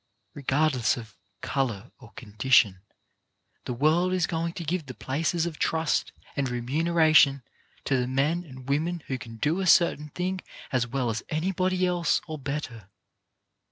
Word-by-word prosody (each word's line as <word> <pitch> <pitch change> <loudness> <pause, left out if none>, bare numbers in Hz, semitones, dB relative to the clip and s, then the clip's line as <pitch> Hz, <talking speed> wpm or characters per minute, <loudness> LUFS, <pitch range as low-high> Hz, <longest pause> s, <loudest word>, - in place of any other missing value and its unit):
Regardless 135 -4 +1
of 110 -4 -10 0.3
colour 125 -5 -2
or 115 -3 -15
condition, 105 -3 +2 0.8
the 125 - -3
world 160 +7 +2
is 180 -2 +2
going 165 0 -2
to 175 - -6
give 165 -1 -2
the 130 - -8
places 160 +5 -1
of 165 -3 -5
trust 160 -1 0 0.2
and 140 -3 0
remuneration 150 +2 +3 0.4
to 135 - +2
the 125 -1 0
men 145 +7 0
and 130 -5 -12
women 160 +4 -1
who 130 -1 -3
can 115 -2 -9
do 150 - 0
a 190 - -1
certain 160 -4 +4
thing 185 +4 -3 0.3
as 125 -2 +1
well 125 -1 -1
as 110 - -3
anybody 185 +3 0
else 175 -2 +1
or 155 -2 -6
better. 130 -7 -5
145 Hz, 155 wpm, -27 LUFS, 125-170 Hz, 0.8 s, certain